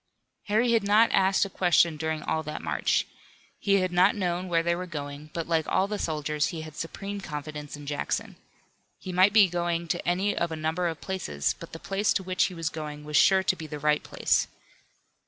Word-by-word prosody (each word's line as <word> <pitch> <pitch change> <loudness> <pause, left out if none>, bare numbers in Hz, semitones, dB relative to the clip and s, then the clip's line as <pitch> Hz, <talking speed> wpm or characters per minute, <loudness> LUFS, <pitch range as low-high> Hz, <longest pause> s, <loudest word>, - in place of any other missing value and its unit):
Harry 225 +3 +2
had 230 -1 +4
not 210 +3 +4
asked 190 +1 +3
a - - -6
question 175 -3 +3
during 160 0 -3
all 160 - -1
that 150 0 -6
march. - - +1 0.5
He 200 -1 +2
had 185 -1 -1
not 180 +4 +4
known 180 -2 -1
where 165 -2 +1
they 170 0 +1
were 180 +1 -5
going, 145 -2 -7
but 165 -1 -4
like 165 -2 +1
all 190 - +2
the 210 0 -3
soldiers 150 -2 -1
he 165 - -5
had 155 -1 -9
supreme 195 +5 -5
confidence 150 -3 -6
in 145 - -10
Jackson. 145 0 -3 0.6
He 185 - -7
might 185 +3 +5
be 205 -2 +7
going 170 -1 -2
to 175 - -2
any 190 +4 +1
of 170 -1 -1
a - - -2
number 160 +3 -1
of 160 -2 -4
places, 125 - -2
but 170 - -10
the - - -7
place 195 +5 0
to 190 - -1
which 185 0 +1
he 185 - -5
was 165 -1 -2
going 150 -2 -7
was 150 0 -5
sure 190 +5 +5
to 190 - +2
be 160 -3 -8
the 150 - -6
right 150 +1 +2
place. - - +1
170 Hz, 215 wpm, -27 LUFS, 155-190 Hz, 0.6 s, be